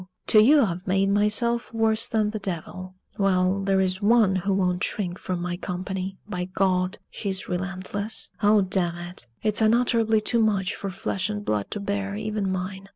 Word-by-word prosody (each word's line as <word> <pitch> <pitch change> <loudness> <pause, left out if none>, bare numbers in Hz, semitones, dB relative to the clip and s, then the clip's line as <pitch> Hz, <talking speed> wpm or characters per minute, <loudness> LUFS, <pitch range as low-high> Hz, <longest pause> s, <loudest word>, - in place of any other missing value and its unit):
to 215 - +6
you 285 +6 +6
I've 180 -3 -3
made 195 +1 +2
myself 215 +4 +1
worse 225 0 +1
than 215 -2 +1
the 215 - -4
devil. 185 0 -5 0.2
Well, 190 -1 +2
there 195 0 +1
is 185 +1 0
one 210 -2 +4
who 190 +2 -1
won't 180 -2 +1
shrink 180 -4 -2
from 185 -1 -3
my 175 0 -3
company! 190 +1 -4
By 180 -3 -3
God! 185 0 0
she's 190 -3 -3
relentless. 190 +3 -3
Oh, 210 0 +5
damn 180 -2 0
it! 175 -7 -3 0.2
It's 215 0 +1
unutterably 225 -1 +3
too 230 +2 0
much 200 -4 +1
for 195 - -5
flesh 185 +1 -2
and 205 -1 -4
blood 105 -2 -1
to - - -4
bear, 200 0 -3
even 210 -2 -2
mine." 190 +1 -5
195 Hz, 175 wpm, -25 LUFS, 185-215 Hz, 0.2 s, to